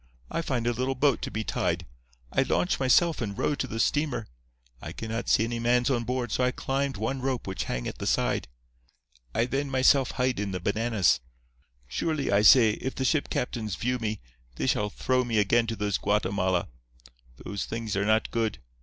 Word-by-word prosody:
I - - -1
find 125 -7 -2
a 120 - +2
little 130 +3 -1
boat 140 0 +2
to - - -3
be 110 - -3
tied. - - -1 0.5
I - - +2
launch 90 +1 +1
myself 145 +5 +3
and 100 -4 -3
row - - +1
to 135 - -2
the 115 -1 -5
steamer. 145 -3 0 0.6
I - - -7
cannot 115 +1 -4
see - - +4
any 115 +1 -2
mans 120 +2 +2
on 120 -3 0
board, 125 -2 -2
so 125 - +1
I 125 - +3
climbed 135 0 -2
one 130 +6 -2
rope 130 -2 -2
which 95 -1 -3
hang - - -3
at - - -6
the - - -3
side. - - +1 0.9
I 115 - +3
then 135 +3 -2
myself 130 0 +4
hide 125 -3 0
in 100 -2 -2
the 90 - -2
bananas. 105 - +2 0.7
Surely, 150 - -1
I 100 0 +4
say, 110 +2 +7
if 130 +5 -4
the 130 - -2
ship 150 +1 +1
captains 110 -6 -2
view 125 +8 -1
me, 110 -2 -3 0.3
they - - -2
shall 105 - +1
throw 130 +5 0
me 115 -3 -1
again 115 +3 +3
to 115 - -2
those 105 -2 -1
Guatemala. 95 -3 0 0.8
Those 100 -2 -3
things 115 -3 -4
are 100 - +1
not 110 +2 +2
good. 115 -3 -1
115 Hz, 200 wpm, -27 LUFS, 105-130 Hz, 0.9 s, say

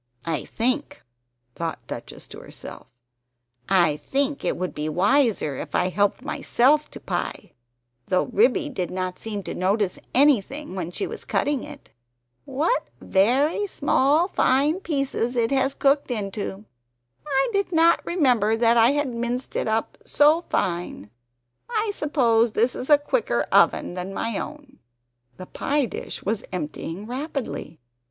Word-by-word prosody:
"I 165 -2 -2
think" 255 +6 -2 0.5
(thought 165 +2 -5
Duchess - - -8
to - - -10
herself) - - -11 0.8
"I 175 -6 +3
THINK 280 - -1
it - - 0
would 185 0 -3
be 150 +1 -3
wiser 200 - +2
if - - -6
I 180 - +2
helped 205 +2 0
myself 290 +5 +2
to - - -10
pie; - - -4 0.6
though 185 - +2
Ribby 255 +4 +2
did 190 -11 -3
not 185 0 -4
seem 210 -3 -5
to - - -5
notice 195 +1 0 0.2
anything 280 0 +2
when 175 -3 -3
she 285 - -3
was - - -7
cutting 285 -3 0
it. - - -11 0.5
What 315 - 0
very 270 - +2
small 295 0 +2
fine 295 0 +2
pieces 275 -8 -1
it 230 0 +1
has 270 0 +1
cooked 280 0 +2
into! 205 -2 -4 0.6
I 270 -2 +1
did 400 -2 0
not 335 0 +4
remember 245 - +2
that 230 0 +4
I 230 +4 +5
had 290 -4 -1
minced 240 +2 -3
it - - -1
up 220 +1 -1
so 300 +3 +4
fine; 170 - -2 0.6
I 440 -2 0
suppose 240 - +2
this 235 +3 +2
is 255 - -6
a 295 - +8
quicker 370 +12 0
oven - - +3
than 185 +2 -5
my 230 -3 -2
own." 295 -3 -9 0.6
The 185 - -8
pie 285 +8 -1
dish - - -7
was 210 +1 -1
emptying 170 +2 -5
rapidly! 255 - -5
245 Hz, 145 wpm, -24 LUFS, 195-290 Hz, 0.8 s, a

